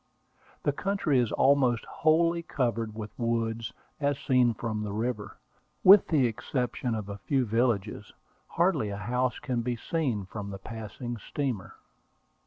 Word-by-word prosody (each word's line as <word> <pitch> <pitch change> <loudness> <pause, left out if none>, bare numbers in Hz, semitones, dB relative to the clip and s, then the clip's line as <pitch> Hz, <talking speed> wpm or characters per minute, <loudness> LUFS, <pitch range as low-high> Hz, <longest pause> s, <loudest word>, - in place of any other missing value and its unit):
The 145 - +2
country 155 -4 +1
is 120 -3 +1
almost 130 -4 +3
wholly 165 +2 +2
covered 115 -8 -2
with 110 -2 -6
woods, 115 -1 -1 0.3
as 145 -1 +1
seen 125 -4 +3
from 110 -2 -3
the 105 -1 -3
river. 110 0 -3 0.5
With 195 +1 +8
the 145 -6 +3
exception 125 +1 -2
of 105 -2 -4
a 100 0 -6
few 135 +1 +1
villages, 115 -2 0 0.4
hardly 105 - +1
a 100 - -4
house 125 +4 -1
can 125 -5 -2
be 120 +1 -1
seen 120 - -2
from 100 +1 -6
the 100 - -6
passing 110 +3 -6
steamer. 120 -4 -4
120 Hz, 145 wpm, -28 LUFS, 110-135 Hz, 0.5 s, With